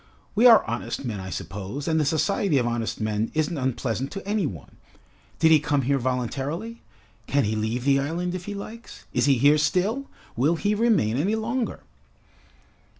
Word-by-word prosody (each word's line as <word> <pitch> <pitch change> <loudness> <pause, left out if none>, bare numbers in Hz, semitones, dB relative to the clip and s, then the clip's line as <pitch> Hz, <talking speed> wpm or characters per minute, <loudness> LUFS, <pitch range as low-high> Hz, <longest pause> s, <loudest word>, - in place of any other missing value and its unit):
We 230 +4 +6
are 230 -3 +7
honest 115 +4 -4
men, 110 -5 -3
I 95 0 -6
suppose, 100 +9 -6
and 160 -1 +2
the - - +1
society 160 +3 +1
of 125 - +1
honest 120 -1 -2
men 110 +1 -1
isn't 155 +2 0
unpleasant 130 -2 -2
to 195 -1 -7
any 205 -5 +1
one. 85 - -10 0.6
Did 160 0 +4
he 155 - +7
come 145 -2 0
here 135 +2 +1
voluntarily? 135 - -3 0.5
Can 140 0 +2
he 110 0 -1
leave 110 +3 -2
the 140 -1 +4
island 170 +5 -2
if 180 -1 -5
he 205 - -5
likes? 220 +4 -9
Is - - +2
he 135 -2 +4
here 145 +5 +5
still? 195 - 0 0.3
Will 145 +8 +2
he 205 +5 0
remain 205 - +2
any 195 +10 +1
longer?" 230 +1 -2
145 Hz, 180 wpm, -25 LUFS, 120-195 Hz, 0.6 s, are